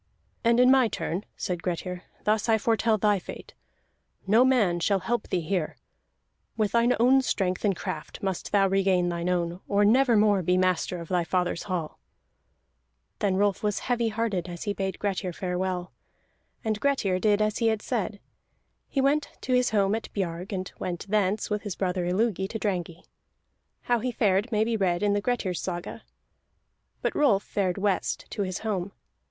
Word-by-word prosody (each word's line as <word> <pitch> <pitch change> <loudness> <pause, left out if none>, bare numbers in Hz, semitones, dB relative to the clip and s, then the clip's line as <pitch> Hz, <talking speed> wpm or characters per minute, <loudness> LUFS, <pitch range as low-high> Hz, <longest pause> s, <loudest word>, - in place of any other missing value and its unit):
"And 235 0 +4
in 250 +1 +6
my 265 -3 +5
turn," 190 -2 -3
said 175 -2 -3
Grettir, 180 +1 -4 0.2
"thus 215 +2 +1
I 220 - +5
foretell 225 0 +2
thy 205 -1 +2
fate. - - -10 0.7
No 220 +5 +5
man 220 -10 +3
shall 195 +2 +1
help 240 +1 -1
thee 180 - 0
here. 170 -1 -2 0.8
With 215 -2 +1
thine 235 +1 +3
own 260 +3 +5
strength 185 -7 -1
and 200 -3 +2
craft 155 +1 -6
must 190 -2 -3
thou 200 -1 +4
regain 190 -2 +2
thine 170 +1 -2
own, 175 -1 -1
or 205 0 +3
never 240 +2 +4
more 205 -2 +4
be 180 +1 +2
master 185 -1 +1
of 170 - -8
thy 180 -2 +1
fathers 180 0 -1
hall!" 170 -4 -3 1.2
Then 195 -2 +1
Rolf 200 0 +1
was 210 -2 0
heavy 240 -2 0
hearted 215 -5 -2
as 175 -1 -6
he 205 - -1
bade 190 -2 -3
Grettir 190 -3 -2
farewell. 180 0 -3 0.7
And 215 -1 0
Grettir 215 -10 +1
did 205 0 +3
as 215 0 0
he 230 - +2
had 220 -1 0
said: 215 -4 -2 0.7
he 275 - 0
went 285 +2 +2
to 255 - -1
his 250 0 +3
home 200 -2 +2
at 225 0 -4
Biarg, 180 0 -3
and 185 -2 -4
went 175 -2 -4
thence 210 0 +1
with 210 0 0
his 205 -5 -5
brother 180 -2 -1
Illugi 190 0 0
to 220 - -4
Drangey. 180 -5 -3 0.8
How 240 -1 +1
he 250 +3 -2
fared 200 -3 +2
there 235 -3 -3
may 215 - +4
be 230 +1 0
read 185 -2 +1
in 205 -1 +3
the 205 - +1
Grettir's 205 -6 -1
Saga. 175 0 -5 1.0
But - - 0
Rolf 225 -10 +3
fared 190 -3 -1
west 200 -1 -1
to 210 - -3
his 185 -2 -2
home. 195 -2 -2
200 Hz, 180 wpm, -27 LUFS, 180-220 Hz, 1.2 s, in